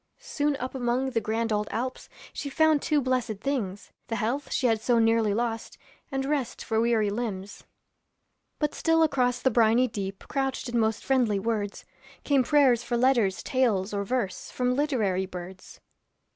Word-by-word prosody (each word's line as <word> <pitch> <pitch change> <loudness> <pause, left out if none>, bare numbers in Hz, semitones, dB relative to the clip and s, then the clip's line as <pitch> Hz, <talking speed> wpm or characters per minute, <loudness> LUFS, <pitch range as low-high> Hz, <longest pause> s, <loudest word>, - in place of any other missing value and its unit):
Soon 295 -1 -1
up 255 -1 -5
among 255 +1 0
the 230 -2 0
grand 225 +1 -1
old 210 0 0
Alps 255 +3 -4 0.2
She 285 - -5
found 315 +1 +3
two 300 -2 +1
blessed 250 -4 -1
things: 205 -7 -3 0.2
The 225 - -2
health 245 +5 -2
she - - 0
had 225 -3 +2
so 240 +1 +2
nearly 225 -1 +3
lost, 230 +1 -2 0.3
And 270 0 -1
rest 280 -3 -2
for 220 -1 0
weary 225 -3 +2
limbs. 205 -3 -5 0.9
But 300 -1 -1
still 325 0 +2
across 250 -5 +1
the 260 - +3
briny 230 +2 +4
deep 195 -3 -5
Couched 270 -2 -2
in 240 0 0
most 220 -1 0
friendly 245 -6 +2
words, 205 -1 -3 0.4
Came 275 -3 +3
prayers 260 -3 +4
for 240 0 -2
letters, 235 -6 +2
tales, 220 -7 +1
or 200 0 -1
verse, 195 -4 -2
From 250 0 0
literary 220 -10 0
birds. 185 0 -9
235 Hz, 165 wpm, -27 LUFS, 215-265 Hz, 0.9 s, briny